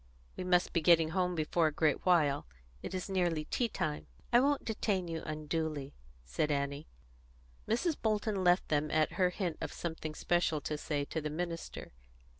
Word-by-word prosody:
"We - - -4
must 180 -1 +2
be 170 - +2
getting 165 0 +5
home 180 +1 0
before 160 +1 +2
a - - 0
great 155 +2 +1
while. 150 - +3 0.3
It 190 - -5
is 185 - -3
nearly 175 -5 0
tea 245 - 0
time." 75 - -3 0.3
"I 240 - +8
won't 280 +2 +2
detain 205 -4 -1
you 165 -1 -4
unduly," 155 -2 -3 0.3
said 65 - -1
Annie. 140 +1 -2 0.8
Mrs. 310 +9 +1
Bolton 215 -3 0
left 180 +1 +3
them 150 0 +1
at 155 0 +2
her 185 -2 +2
hint 180 -3 -3
of - - -3
something 160 -2 -5
special 175 -2 +1
to 150 - -3
say 145 -1 -2
to 160 - -3
the 150 - -3
minister. 165 +2 -5
165 Hz, 175 wpm, -33 LUFS, 150-185 Hz, 0.8 s, I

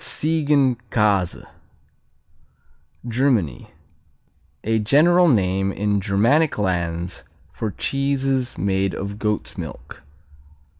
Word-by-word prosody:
Ziegenkäse 125 - +1 1.6
Germany 115 - 0 1.0
A 110 0 +1
general 170 +11 +4
name 95 - +2
in 100 0 0
Germanic 115 +12 +2
lands 85 -3 -2 0.3
for 110 - -4
cheeses 135 +1 -1
made 95 -1 0
of 100 +1 -5
goat's 105 -1 -2
milk. - - -9
110 Hz, 80 wpm, -21 LUFS, 95-135 Hz, 1.6 s, general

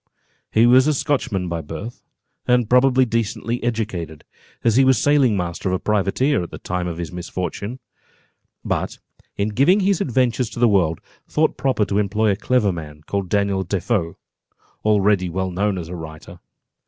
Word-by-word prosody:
He 110 +2 +4
was 130 +3 +6
a 155 - +2
Scotchman 115 - -1
by 85 -1 -3
birth, 80 +10 -8 0.5
and 125 -2 +3
probably 125 +2 +4
decently 115 +1 -2
educated, 100 -10 -3 0.4
as 115 -2 +3
he 135 - +5
was 130 -2 +4
sailing 135 -4 +3
master 90 +1 -3
of 90 - +1
a - - -2
privateer, 105 +7 +1
at 85 - -6
the - - -8
time 90 0 -3
of 85 -2 -4
this 85 -2 -5
misfortune; 90 +6 -5 0.9
but - - -2 0.4
in 100 +1 0
giving 140 - +3
his 195 -1 +1
adventures 125 -2 +1
to 115 - -8
the 120 - +5
world, 90 -7 +2 0.3
thought 155 +1 +1
proper 130 -6 +1
to 100 +1 0
employ 105 +1 +1
a - - +1
clever 110 -1 +1
man, 75 -3 -8
called 100 -2 -3
Daniel 100 -1 +1
Defoe, 95 -1 -1 0.7
already 100 -3 +2
well 95 +2 -2
known 100 +2 0
as 85 -2 -5
a 90 - -6
writer. 80 -2 -10
105 Hz, 170 wpm, -21 LUFS, 90-125 Hz, 0.9 s, was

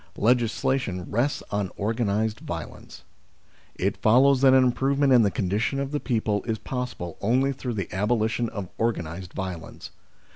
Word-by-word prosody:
Legislation 115 -4 +1
rests 120 +7 0
on 100 -2 -1
organised 110 0 0
violence. - - -8 0.7
It 95 +2 -1
follows 130 +4 +5
that 135 -1 +7
an 130 0 +6
improvement 135 +2 +2
in 125 - +7
the 105 - +3
con 95 0 -2
dition 105 +8 0
of 140 0 -3
the 150 - -1
people 110 -6 0
is 110 -2 -1
possible 125 -9 -5
only 130 +6 +2
through 125 -2 -5
the 95 -4 -4
abolition 110 +3 0
of 100 -4 -6
organised 90 -6 -2
violence. 95 -3 -6
110 Hz, 150 wpm, -25 LUFS, 100-130 Hz, 0.7 s, that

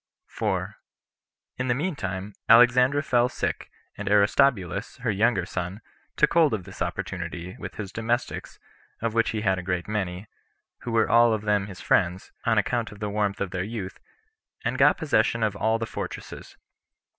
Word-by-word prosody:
4. - - -3 0.8
In 125 - -2
the 120 - +2
mean 165 +5 -2
time, 95 -2 -5 0.2
Alexandra 125 +4 +6
fell 125 -2 +2
sick, - - -3 0.3
and 100 -1 -4
Aristobulus, 105 -1 +2
her 120 - +1
younger 105 -2 +2
son, 90 +2 -4 0.4
took 150 - +3
hold 160 -7 +4
of 100 - -6
this 95 0 -12
opportunity, 90 0 -4
with - - -7
his 100 -2 -6
domestics, 120 +3 -2 0.5
of 115 -1 0
which 115 0 +2
he 110 - -2
had 95 -3 +1
a - - -4
great 90 -1 -2
many, 95 -2 -3 0.5
who 120 - -6
were 115 -1 +3
all 115 0 +5
of 110 -1 -2
them 105 -2 +1
his 95 -3 -10
friends, 90 -1 +1
on 115 -1 +2
account 115 +2 0
of 105 - -12
the 105 -1 -3
warmth 105 -1 -1
of 100 -2 -2
their 90 - -2
youth, 100 -3 -6 0.7
and - - -1
got - - +5
possession 140 -7 +1
of 105 -2 0
all 110 +2 +1
the 115 - -3
fortresses. - - -7
105 Hz, 175 wpm, -26 LUFS, 95-120 Hz, 0.8 s, Alexandra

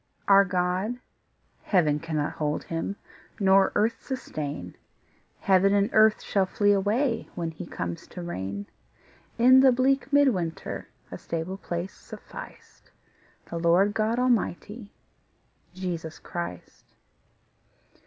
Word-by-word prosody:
Our 200 0 +7
God, 185 +5 -1 0.6
heaven 155 -7 +2
cannot 155 -3 -2
hold 150 -1 -2
Him, 165 +4 -3 0.4
Nor 195 -1 +4
earth 225 +2 +1
sustain; 145 - -5 0.7
Heaven 195 +1 +4
and 200 0 +2
earth 220 0 +5
shall 195 -2 +1
flee 205 +2 +2
away 220 +6 +1
When 165 -1 -3
He 165 +2 -9
comes 85 - -5
to 180 - -8
reign: 100 - -5 0.7
In 255 +2 +7
the 265 0 +7
bleak 265 +2 +1
mid 285 -1 +5
winter 170 -8 -4 0.2
A - - -7
stable 170 +3 -4
place 175 0 -5
sufficed - - -12 0.6
The 170 - -3
Lord 175 +5 +3
God 220 +2 0
Almighty, 230 -3 -1 0.9
Jesus 170 -4 -5
Christ. 170 - -8
190 Hz, 115 wpm, -26 LUFS, 165-220 Hz, 0.9 s, Our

